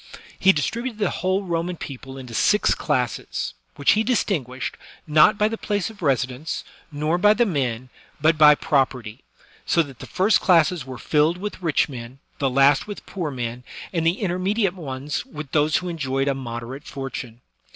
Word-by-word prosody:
He 190 - +6
distributed 225 - -2
the 205 -4 0
whole 185 +2 0
Roman 175 -1 -2
people 135 -2 -8
into 125 -3 -9
six 210 - +3
classes, 125 -6 -2 0.2
which 140 - +3
he 215 +2 +3
distinguished, 155 - -1 0.3
not 155 +7 +5
by 210 0 +3
the 225 +1 -4
place 205 -1 -1
of 210 - -17
residence, 135 0 -1 0.3
nor 155 +4 0
by 210 +3 +5
the 240 - +3
men, 130 - -2 0.3
but 160 +3 +4
by 150 -1 +7
property; 130 -6 0 0.4
so 170 - +2
that 135 -5 -12
the - - -9
first 195 +4 +2
classes 170 -5 +3
were 130 -1 -7
filled 155 +6 +2
with 200 0 -6
rich 165 -4 +2
men, 125 -2 -8 0.2
the 140 -2 +2
last 135 +4 +4
with 205 - -8
poor 175 -6 -4
men, 125 -2 -5 0.3
and 165 -2 0
the 175 +6 +1
intermediate 190 +1 0
ones 145 -4 -4
with 150 -2 -9
those 150 0 +2
who 180 - -4
enjoyed 135 -5 -1
a 140 - +2
moderate 125 +1 -6
fortune. 130 -3 -7
150 Hz, 170 wpm, -23 LUFS, 130-185 Hz, 0.4 s, by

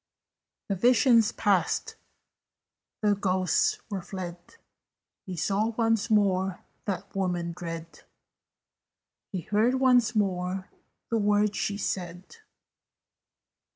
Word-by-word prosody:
The 200 - 0
vision 235 +3 +5 0.2
passed: 190 -5 +1 1.1
the 210 -1 +4
ghosts 185 -3 +1
were 195 -2 -2
fled: 175 -1 -6 0.9
He 185 - -4
saw 200 +7 +1
once 225 -1 +1
more 195 -3 +2 0.2
that 195 -1 -4
woman 175 -3 -1
dread: 165 -1 -7 1.3
He 185 - -3
heard 215 +8 +2
once 250 -3 +3
more 185 -2 -1 0.4
the 230 - +2
words 205 0 +2
she 200 +1 -1
said. 180 - -4
195 Hz, 95 wpm, -27 LUFS, 180-215 Hz, 1.3 s, vision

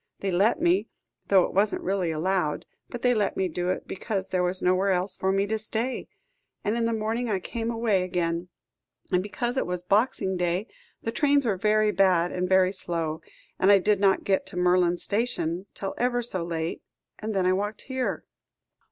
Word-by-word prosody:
They 195 - -1
let 200 - +3
me 345 +3 +2 0.4
though 190 -2 +5
it - - -3
wasn't 205 +2 +1
really 190 -2 0
allowed 160 -1 -1 0.2
but 245 - -7
they 250 0 +4
let 210 -4 0
me 190 - +1
do 175 +1 -2
it, 185 - -2
because 195 0 -3
there 185 - 0
was 180 +1 +1
nowhere 185 +2 +2
else 185 +1 0
for 190 - 0
me 195 +1 +2
to 220 +2 -2
stay; 225 +4 -3 0.6
and 210 +2 0
in 235 -1 0
the 230 - +1
morning 225 +2 -1
I 205 - +1
came 230 +4 -4
away 225 -4 +1
again, 175 -1 -2 0.6
and 180 - +3
because 240 +5 -3
it - - 0
was 180 0 -3
Boxing 195 -1 +1
Day, 180 +3 0 0.4
the 225 - -2
trains 285 +2 +2
were 215 -4 +1
very 215 +2 +2
bad 180 -3 +3
and 180 0 -2
very 190 -1 +4
slow, 165 -4 -3 0.4
and 190 - +4
I 200 - +8
did 205 +1 +2
not 195 -1 +3
get 195 -1 0
to - - -8
Merlands 180 -1 +2
Station 200 -5 -1
till 195 - -4
ever 245 0 +1
so 185 -7 -1
late; 165 -1 -3 0.4
and 215 0 -4
then 190 -1 +2
I 185 - +4
walked 205 +2 -3
here." 260 -1 -3
195 Hz, 195 wpm, -26 LUFS, 180-220 Hz, 0.6 s, I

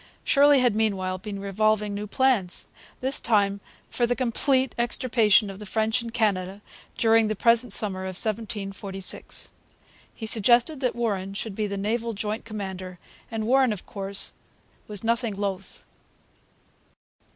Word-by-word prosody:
Shirley 285 -1 +5
had 245 -4 +2
meanwhile 190 -4 -1
been 200 +1 -6
revolving 210 +1 0
new 205 +1 -5
plans, 215 -6 +1 0.4
this 265 +2 +1
time 200 -3 +2 0.3
for 240 - 0
the 245 - 0
complete 260 +1 +1
extirpation 230 -3 +2
of 195 - -11
the 210 - -8
French 220 +3 0
in 230 - -6
Canada 200 -4 -1 0.4
during 225 -1 +4
the 215 - -2
present 235 +2 +3
summer 195 -2 +4
of 190 -1 -5
1746. 200 -3 -2 0.7
He 225 - -7
suggested 240 +6 +4
that 250 -3 -1
Warren 200 -5 -2
should 215 +1 -5
be 215 0 -1
the 200 0 -4
naval 230 +3 -2
joint 215 +2 -4
commander, 190 -4 -6 0.3
and 225 -1 -3
Warren, 260 +1 +3
of 205 -3 -6
course, 195 0 -3 0.5
was 210 -1 -1
nothing 230 -2 0
loth. 195 -1 -5
215 Hz, 140 wpm, -25 LUFS, 195-235 Hz, 0.7 s, Shirley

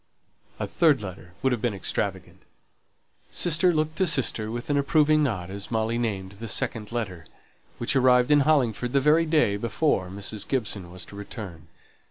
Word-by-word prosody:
A - - -1
third 155 -9 +2
letter 90 -2 -9
would 130 - +3
have 120 -3 -1
been 115 -3 0
extravagant. 95 - -3 0.9
Sister 175 +1 +3
looked 155 -1 -1
to 190 - +3
sister 130 -8 +1
with 120 +5 -4
an - - +2
approving 155 +2 +3
nod 100 -10 -1
as 100 0 -6
Molly 115 +1 0
named 100 -5 -2
the 105 +3 -8
second 110 -1 -2
letter, 95 -9 -4 0.5
which 120 +3 -1
arrived 125 0 +4
in 145 - +6
Hollingford 125 -5 +1
the 140 - +4
very 155 +4 +3
day 150 -11 +2
before 105 - 0
Mrs. 100 +2 -5
Gibson 105 -8 -2
was 90 0 -7
to - - -13
return. 95 -5 -8
120 Hz, 170 wpm, -26 LUFS, 100-145 Hz, 0.9 s, in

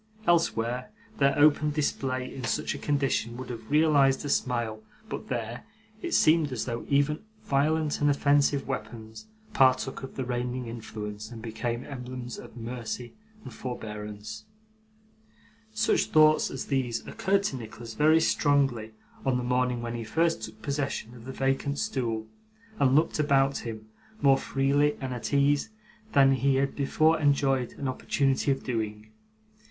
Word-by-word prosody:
Elsewhere, 125 - +1 0.3
their 140 0 +3
open 150 0 +5
display 135 -4 -2
in 130 - -7
such 115 - -1
a - - -7
condition 135 -5 0
would 130 0 -6
have 115 -2 -8
realised 145 -3 +4
a - - -3
smile; 120 -5 -1 0.3
but, - - -5
there, 120 -1 -4 0.4
it 345 - -1
seemed 155 -2 +4
as 125 -4 -2
though 120 -1 -4
even 145 +2 +2 0.2
violent 150 +2 +1
and 145 - +4
offensive 140 0 +3
weapons 110 -4 -6 0.3
partook 130 -4 +3
of 135 - -8
the 130 - -3
reigning 125 0 -2
influence, 110 -2 -6
and 120 -2 -9
became 120 +2 -3
emblems 125 -2 -7
of - - -12
mercy 120 0 -5 0.3
and - - -9
forbearance. 110 -3 -7 1.3
Such 220 +1 +2
thoughts 155 -1 +5
as 135 - -5
these 130 -4 -1
occurred 195 +1 +1
to 145 - -1
Nicholas 115 0 -8
very 155 +4 +5
strongly, 135 -8 +1 0.3
on 130 -2 +1
the 125 - -2
morning 125 -1 0
when 115 0 -3
he 120 -1 -4
first 165 +5 +1
took 110 0 -9
possession 140 -3 -2
of 120 -2 -12
the 130 - -5
vacant 135 +2 -1
stool, 115 -6 -2 0.5
and 130 -1 +4
looked 155 +1 +2
about 140 -2 +3
him, 110 -2 -7 0.3
more 135 -1 +5
freely 140 +2 +1
and 130 -2 -4
at 120 - -5
ease, 145 +5 +3 0.4
than 135 -2 +6
he 135 0 +2
had 135 +1 0
before 155 +3 +2
enjoyed 135 -4 +2
an 140 - -4
opportunity 135 +1 0
of 135 -1 0
doing. 110 -3 -3
130 Hz, 150 wpm, -28 LUFS, 115-145 Hz, 1.3 s, than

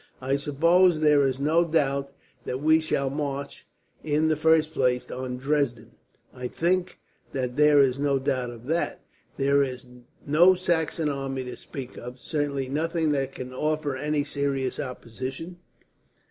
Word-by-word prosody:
"I 135 +1 0
suppose 165 +5 +3
there 150 -2 +4
is 130 0 -2
no 155 +4 +3
doubt 140 -4 0 0.3
that 125 - -3
we 155 +2 +4
shall 140 -4 -1
march, 140 -1 -4 0.4
in 155 +1 +1
the 155 - +3
first 160 +1 +3
place, 125 -1 0
on 125 0 -4
Dresden." 135 -4 -1 0.4
"I 125 -1 -5
think 180 +5 0 0.4
that 125 -2 -2
there 150 0 +5
is 135 -1 +2
no 140 -1 +2
doubt 130 -2 -1
of 120 0 -11
that. 165 +5 -1 0.4
There 140 +1 +3
is 130 -1 -3 0.4
no 170 +6 +6
Saxon 165 -3 0
army 135 -2 -3
to 125 - -7
speak 130 -3 -9
of, 125 +1 -8
certainly 140 -1 -2
nothing 160 +3 0
that 135 -2 -1
can 130 0 -7
offer 150 0 -1
any 150 +2 -1
serious 140 -2 -2
opposition. 130 +5 -6
140 Hz, 150 wpm, -26 LUFS, 130-155 Hz, 0.4 s, no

